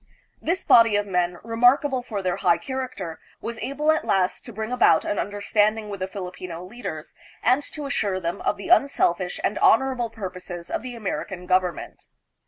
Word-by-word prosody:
This 350 +4 -1
body 230 -2 +6
of 205 0 +1
men, 180 -2 0
remarkable 245 +4 +3
for 215 -5 -5
their 180 -1 0
high 170 - +3
character, 255 - -5 0.2
was 230 -1 -6
able 285 +5 +1
at 315 - 0
last 185 -1 +1
to 240 - -8
bring 220 +1 -5
about 245 -10 +4
an 205 - -1
understanding 210 +1 0
with 200 -1 -6
the 185 - -2
Filipino 180 -3 -7
leaders 185 -7 -7 0.3
and 255 +4 +4
to 295 0 -8
assure 205 -9 -1
them 170 -1 -3
of - - 0
the 200 - -7
unselfish 185 - +2
and 205 - 0
honorable 250 -1 +3
purposes 185 -5 -7
of - - -1
the 250 -1 -7
American 190 -4 -4
government. 180 -2 -1
205 Hz, 175 wpm, -24 LUFS, 185-245 Hz, 0.3 s, body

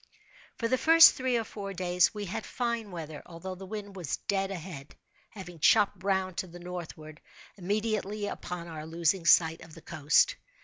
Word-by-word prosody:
For 230 - -1
the 255 +2 +1
first 330 0 +8
three 255 -2 0
or 230 - -1
four 200 -2 -7
days 180 0 +2
we 210 -1 -6
had 195 +4 -4
fine 235 -3 -3
weather, 160 -4 -7
although 175 +2 -8
the 190 +1 -10
wind 205 -1 -7
was 175 -8 -3
dead 195 -1 -1
ahead; 165 -6 -8 0.3
having 175 -5 -10
chopped 195 +5 +4
round 190 -2 0
to 185 - -2
the 175 0 -11
northward, 170 -3 -8 0.3
immediately 210 +1 -2
upon 180 -3 -6
our 155 -2 -7
losing 170 +2 0
sight 160 -1 +5
of 160 - -13
the 165 - -12
coast. 155 - +2
185 Hz, 175 wpm, -29 LUFS, 165-205 Hz, 0.3 s, first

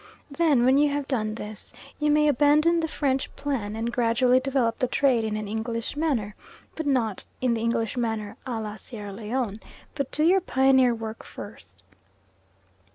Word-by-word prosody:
Then, 280 -5 +3
when 265 +2 +5
you 295 0 +4
have 285 -1 -2
done 215 -5 -1
this, 210 -2 -9 0.3
you 300 0 +1
may 300 0 +4
abandon 300 +4 +4
the 325 - 0
French 270 -4 -1
plan, 235 -8 -3
and 230 +1 -3
gradually 245 +1 +3
develop 260 -3 0
the 255 - +1
trade 255 -2 +2
in 215 -1 -2
an 215 -1 -4
English 230 +3 -3
manner, 270 -10 -1 0.4
but 320 -2 -4
not 235 -7 0
in 250 -2 +1
the 225 - -2
English 230 0 0
manner 220 -3 -2
a 235 -3 -2
la 215 -1 -5
Sierra 210 -5 -8
Leone. 220 0 -3 0.3
But 280 -3 -3
do 305 - 0
your 370 +4 +5
pioneer 265 -6 +3
work 225 0 -7
first. - - -11
245 Hz, 170 wpm, -26 LUFS, 225-285 Hz, 0.4 s, when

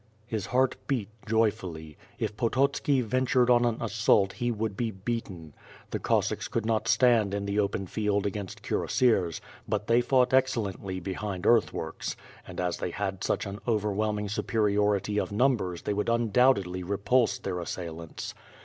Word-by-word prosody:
His 110 -4 -3
heart 130 0 +2
beat 120 -8 -1 0.2
joyfully. 95 -8 -1 0.2
If 105 - -3
Pototski 135 +4 +1
ventured 125 +1 +2
on 120 0 +5
an 115 -1 +1
assault 110 -3 +2
he 120 - -2
would 110 -3 -2
be 115 +2 -1
betiten. 95 - -5 0.4
The - - -2
Cossacks - - 0
could 115 -2 -2
not 110 -1 0
stand 115 -6 +4
in 100 0 -2
the 100 +1 0
open 100 -1 0
field 105 +1 -1
against 100 -1 -5
cuirassiers, 95 -10 +1 0.3
but - - -1
they 115 +2 +4
fought 125 0 +2
excellently 105 -8 0
be 95 +2 -4
hind 100 -2 -4
earthworks, 115 -2 +1 0.3
and - - -8
iis 90 -1 -1
they - - -3
had 95 0 -3
such - - 0
an 100 +1 -6
overwhelming 105 -1 0
superiority 105 -1 +1
of - - -3
numbers 105 -6 +1
they 105 - -1
would 105 +1 -1
undoubt(»dly 115 -5 +2
repulse 105 +6 +1
their 90 -2 -4
assailants. 85 -2 -6
105 Hz, 155 wpm, -28 LUFS, 95-120 Hz, 0.4 s, on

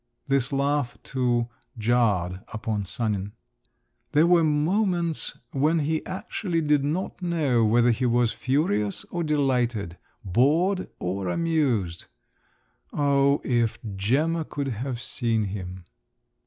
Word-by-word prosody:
This 135 -2 +1
laugh, 140 -1 0
too, 120 -3 0 0.3
jarred 105 -6 +1
upon 110 -2 -3
Sanin. 105 -1 -2 0.8
There 155 +2 +5
were 170 -1 +5
moments 170 +2 +1
when 150 +5 +2
he 155 +1 0
actually 185 -1 -2
did 150 -2 +2
not 170 +7 -2
know 155 -9 +1
whether 120 +2 +4
he 125 +2 0
was 120 -1 +2
furious 130 - 0
or 175 -1 -1
delighted, 125 - 0 0.3
bored 155 - +2
or 95 +1 -3
amused. 130 - 0 0.8
Oh, 140 -1 +2
if 120 -3 +1 0.2
Gemma 150 +12 +1
could 140 -2 -4
have 125 +1 -4
seen 115 -3 -1
him! 95 -2 -6
130 Hz, 115 wpm, -25 LUFS, 110-155 Hz, 0.8 s, There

